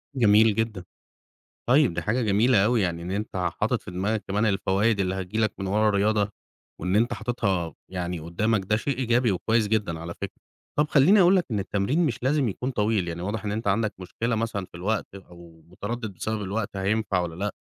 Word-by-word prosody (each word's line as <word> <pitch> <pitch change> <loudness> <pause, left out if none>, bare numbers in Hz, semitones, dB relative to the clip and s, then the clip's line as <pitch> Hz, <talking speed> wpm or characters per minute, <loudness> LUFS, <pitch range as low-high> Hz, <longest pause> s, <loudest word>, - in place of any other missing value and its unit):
جميل 110 -3 +5
جدًا. 110 -4 -2 0.9
طيب، 135 - +5
دي - - -2
حاجة 115 +4 0
جميلة 105 0 +3
أوي، 115 -1 +2
يعني 85 -2 -1
إن 90 - -5
أنت 105 0 -4 0.3
حاطِط - - +1
في - - -9
دماغك 100 +4 -1
كمان 105 +3 +1
الفوايد 100 +1 +1
اللي 95 0 0
هتيجي 95 +3 -4
لك 110 -1 +1
من 95 - -3
ورا 105 +2 +2
الرياضة 105 0 +2 0.5
وإن 90 +3 0
أنت 115 +3 +2
حاطِطها 100 - -1 0.2
يعني 90 -2 -3
قُدّامك، 95 +6 -1
ده 105 +3 +2
شيء 135 +3 -2
إيجابي 120 -3 +2
وكويس 110 +4 +1
جدًا 100 -7 -1
على 85 +1 -6
فكرة. - - -8 0.4
طَب 150 +1 +3
خلّيني 160 +9 +5
أقول 180 +2 +6
لك 180 - +2
إن 105 - 0
التمرين 105 - 0
مش 125 -3 -3
لازم 135 -3 +2
يكون 125 +7 -3
طويل، 105 -5 0
يعني 85 0 -4
واضح 105 +4 -3
إن 100 - -1
أنت 110 +1 -3
عندك 105 +1 +1
مشكلة 115 +6 -2
مثلًا 110 -3 -2
في 85 - -13
الوقت 100 +2 -2
أو 85 -3 -14
متردِّد 110 +4 -5
بسبب 110 +3 -3
الوقت 100 +1 -3
هينفع 100 -1 0
والّا 85 -2 -3
لأ، 100 +3 -2
105 Hz, 200 wpm, -25 LUFS, 95-115 Hz, 0.9 s, أقول